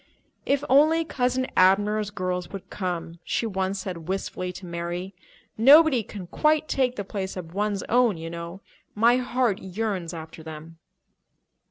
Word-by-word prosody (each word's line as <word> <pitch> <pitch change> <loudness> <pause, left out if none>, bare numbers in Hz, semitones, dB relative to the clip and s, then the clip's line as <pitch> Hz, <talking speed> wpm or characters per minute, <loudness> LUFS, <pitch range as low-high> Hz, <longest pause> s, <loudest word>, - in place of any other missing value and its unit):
"If 280 0 +2
only 310 +5 +4
Cousin 255 -3 0
Abner's 205 +3 +3
girls 185 -3 -3
would 195 -2 -9
come!" 175 -3 -4
she - - -1
once 190 -2 -2
said 170 -4 -6
wistfully 185 -1 -3
to 180 +1 -9
Mary. 175 +2 -4 0.5
"Nobody 280 +1 +7
can 200 -3 -8
quite 305 - +1
take 255 -2 +1
the 205 - -3
place 195 -1 -5
of 165 -2 -7
one's 205 0 -1
own, 240 -5 +2
you 165 +1 -6
know. 170 +2 -7 0.3
My 235 +3 +4
heart 245 -4 0
yearns 190 -3 -3
after 160 -1 -9
them." 160 +1 -10
195 Hz, 150 wpm, -25 LUFS, 175-245 Hz, 0.5 s, Nobody